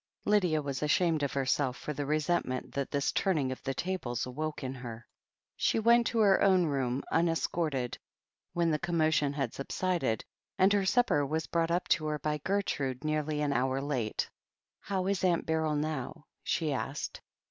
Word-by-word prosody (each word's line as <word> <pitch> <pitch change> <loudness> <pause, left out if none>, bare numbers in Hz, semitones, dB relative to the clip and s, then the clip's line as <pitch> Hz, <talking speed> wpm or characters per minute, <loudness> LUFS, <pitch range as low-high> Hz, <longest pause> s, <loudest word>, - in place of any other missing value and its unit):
Lydia 180 -7 +3
was 140 -1 -3
ashamed 160 +1 +2
of 140 - -1
herself 135 -1 0
for 150 - -5
the 145 -1 -3
resentment 155 -4 0
that 140 -1 -2
this 140 -1 0
turning 155 -9 +1
of 130 - -6
the 135 - -2
tables 160 -11 -2
awoke 150 +4 -4
in 130 0 -3
her. 120 -3 -8 0.5
She - - +1
went 235 +1 +5
to 235 - -2
her 200 -3 +5
own 190 -3 +5
room, 135 -3 -1
unescorted, 165 -5 0 0.5
when 170 -1 +2
the 150 - +1
commotion 160 -4 +2
had 140 -1 -2
subsided, 140 -4 -1 0.3
and 190 +2 +5
her 200 -2 +2
supper 235 -11 +3
was 155 +3 -1
brought 165 -1 0
up 175 +2 0
to 155 - +2
her 150 0 -1
by 150 +1 -2
Gertrude 140 -8 -1
nearly 155 -1 -1
an 145 -1 +1
hour 130 +1 +1
late. 135 -6 -1 0.5
'How 190 -2 -2
is 195 -1 0
Aunt 175 -2 +2
Beryl 160 -1 +1
now?" 150 0 -3 0.2
she 155 -4 0
asked. 135 +2 -4
150 Hz, 170 wpm, -31 LUFS, 135-175 Hz, 0.5 s, went